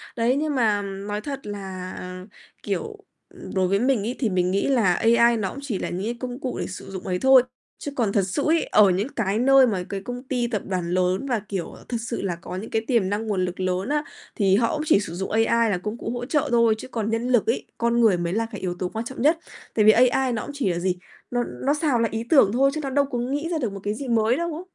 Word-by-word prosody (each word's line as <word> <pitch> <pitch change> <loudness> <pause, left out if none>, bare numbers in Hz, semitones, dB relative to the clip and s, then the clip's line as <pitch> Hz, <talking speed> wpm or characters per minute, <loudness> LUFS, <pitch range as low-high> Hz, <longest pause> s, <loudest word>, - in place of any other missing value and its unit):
Đấy, 235 +2 +2
nhưng 300 0 -1
mà 215 -5 +2
nói 200 +1 -5
thật 275 +2 -5
là, 190 -3 -6
ờ, 180 +1 -8 0.4
kiểu 445 -1 -3 0.6
đối 185 -1 +2
với 195 +2 +2
mình 255 0 +2
ấy 245 - -3
thì 235 - +1
mình 180 -1 +1
nghĩ 195 - +1
là 230 -10 +3
AI 235 +3 +4
nó 195 -3 -1
cũng 280 - -8
chỉ 245 -9 -3
là - - -3
những 185 +3 -4
cái 235 +2 -3
công 250 0 -5
cụ 260 -3 -4
để - - -2
sử 185 - -8
dụng 190 -1 -6
ấy 180 -1 -1
thôi. 265 +1 +6 0.4
Chứ 285 - -4
còn 230 -6 +1
thật 200 -1 +2
sự 240 +10 -1
ấy, 330 +1 +3
ở 210 -2 +5
những 190 +5 0
cái 210 -2 0
nơi 270 +1 +6
mà 195 -6 -1
cái 195 -1 -4
công 245 +4 -6
ty 250 -3 -1
tập 215 -4 -2
đoàn 180 -3 -2
lớn 185 +5 +1
và, 240 -4 0
kiểu, 190 -4 -3
ờ, - - -14
thật 240 - -1
sự 230 0 -4
là 185 -3 -2
có 170 +1 -8
những 200 +4 -6
cái 220 - 0
tiềm 230 -8 +2
năng, 210 +2 -2
nguồn 190 -4 0
lực 180 +1 -6
lớn 185 +4 -1
á, 295 0 +1 0.3
thì 195 -3 +3
họ 230 +2 +2
cũng 305 - -2
chỉ 200 - +5
sử 180 -5 -5
dụng 190 +2 -4
AI 225 +1 +3
là 195 - +1
công 215 +2 -3
cụ - - -5
hỗ 245 0 -4
trợ 295 +2 0
thôi, 230 -2 +4
chứ 220 - -8
còn 225 -4 -3
nhân 225 +2 -1
lực 245 -4 +3
ấy, 230 - 0
con 235 0 +2
người 215 -6 +5
mới 170 0 -2
là 225 +2 0
cái 205 - -7
yếu 180 -1 -2
tố 180 - -2
quan 225 +4 -4
trọng 260 0 -6
nhất. 315 +4 +4 0.4
Tại 215 - +3
vì 215 - +9
AI 255 +2 +3
nó 220 - -2
cũng - - -7
chỉ 280 -8 -1
là 170 - -2
gì, 180 0 0 0.4
nó 245 0 +1
nó 280 +3 -1
xào 295 -5 +1
lại 230 - +1
ý 225 0 -2
tưởng 270 -10 +6
thôi 275 +3 +3
chứ 310 - -3
nó 275 - -2
đâu 280 +1 +2
có 270 -3 -4
nghĩ 285 +7 -2
ra 335 - 0
được 240 -9 -2
một 195 - -6
cái 205 +1 -1
gì 270 +4 -6
mới 230 0 +2
đâu 340 -1 -2
á. 325 - -6
225 Hz, 285 wpm, -24 LUFS, 195-255 Hz, 0.6 s, vì